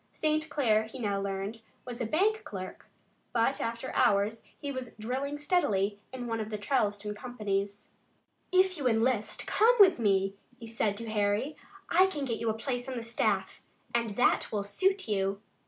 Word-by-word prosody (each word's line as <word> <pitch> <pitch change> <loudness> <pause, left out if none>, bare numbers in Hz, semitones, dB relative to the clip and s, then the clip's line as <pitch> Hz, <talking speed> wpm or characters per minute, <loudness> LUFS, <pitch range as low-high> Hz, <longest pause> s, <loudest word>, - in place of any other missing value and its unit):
St. 310 0 0
Clair, 220 -8 +2
he 225 +4 -9
now 200 -5 -1
learned, 200 +3 -3 0.2
was 245 0 -6
a 235 - 0
bank 415 - +2
clerk, 185 -2 -7 0.5
but 240 +3 +2
after 230 +3 -3
office - - +4
hours 215 -1 +2 0.2
he 285 - -4
was 260 -3 -6
drilling 265 +6 -2
steadily 215 - +1
in 255 -1 -5
one 230 -1 -2
of 215 -1 -3
the 215 - -3
Charleston 210 -2 0
companies. 205 -3 -3 0.6
"If 370 0 +4
you 270 - +1
enlist, 225 -1 +1
come 465 +3 +4
with 375 -8 +7
me," 195 -3 +2 0.3
he 230 - -8
said 220 -2 0
to 230 0 -5
Harry. 210 +7 +1 0.4
"I 370 +3 +6
can 295 -7 -3
get 235 -3 -2
you 230 - 0
a 220 - 0
place 245 +2 -3
on 260 - -4
the 235 - -4
staff, 230 +1 0 0.3
and 230 -3 0
that 245 - +3
will 205 -2 -1
suit 380 - 0
you." 195 -1 0
230 Hz, 180 wpm, -30 LUFS, 205-275 Hz, 0.6 s, with